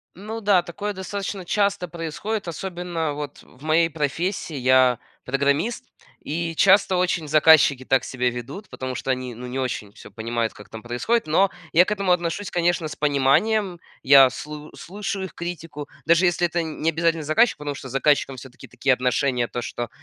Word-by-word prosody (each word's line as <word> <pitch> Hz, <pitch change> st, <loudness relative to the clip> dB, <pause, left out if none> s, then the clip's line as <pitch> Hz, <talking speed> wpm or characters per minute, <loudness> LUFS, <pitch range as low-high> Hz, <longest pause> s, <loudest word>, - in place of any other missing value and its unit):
Ну 215 Hz, +4 st, -7 dB
да 200 Hz, -4 st, +3 dB
такое 205 Hz, +5 st, -5 dB
достаточно 195 Hz, 0 st, -5 dB
часто 200 Hz, -1 st, 0 dB
происходит, 175 Hz, +6 st, -4 dB
особенно 170 Hz, -2 st, -3 dB
вот 145 Hz, -1 st, -7 dB
в 125 Hz, -, -20 dB
моей 160 Hz, +2 st, +3 dB
профессии. 160 Hz, +3 st, -2 dB
Я 130 Hz, -1 st, +4 dB, 0.3 s
программист, 140 Hz, -, 0 dB, 0.4 s
и 165 Hz, +1 st, -3 dB
часто 195 Hz, 0 st, +5 dB
очень 180 Hz, -3 st, 0 dB
заказчики 150 Hz, -3 st, +5 dB
так 130 Hz, -1 st, +2 dB
себя 125 Hz, -1 st, -1 dB
ведут, 135 Hz, -, -8 dB
потому 130 Hz, -1 st, -5 dB
что 135 Hz, -, -2 dB
они 130 Hz, -2 st, -3 dB
ну 125 Hz, +2 st, -8 dB
не 125 Hz, +2 st, -4 dB
очень 110 Hz, -6 st, -4 dB
всё -, -, -13 dB
понимают, 115 Hz, +2 st, -3 dB
как 105 Hz, -, -14 dB
там 110 Hz, -1 st, -9 dB
происходит. 140 Hz, -, -1 dB
Но 190 Hz, +5 st, +3 dB, 0.2 s
я 175 Hz, +3 st, +6 dB
к -, -, -4 dB
этому 200 Hz, -3 st, 0 dB
отношусь, 180 Hz, +3 st, -1 dB
конечно, 175 Hz, -1 st, 0 dB
с 150 Hz, -, -7 dB
пониманием. 170 Hz, +8 st, +2 dB, 0.2 s
Я 135 Hz, -1 st, +7 dB
слу 150 Hz, 0 st, -8 dB
слушаю 195 Hz, +1 st, -5 dB
их 190 Hz, -, -10 dB
критику, 165 Hz, -4 st, -6 dB, 0.2 s
даже 170 Hz, +3 st, +5 dB
если 175 Hz, 0 st, +2 dB
это 170 Hz, 0 st, -1 dB
не 160 Hz, 0 st, -2 dB
обязательно 165 Hz, 0 st, 0 dB
заказчик, 155 Hz, +11 st, +3 dB
потому 145 Hz, -1 st, -5 dB
что 135 Hz, -, -9 dB
с -, -, -10 dB
заказчиком 135 Hz, -1 st, +1 dB
все-таки 125 Hz, 0 st, -12 dB
такие 125 Hz, +2 st, 0 dB
отношения, 125 Hz, 0 st, 0 dB
то 120 Hz, -, -4 dB
что 120 Hz, 0 st, -5 dB
155 Hz, 175 wpm, -23 LUFS, 130-180 Hz, 0.4 s, Я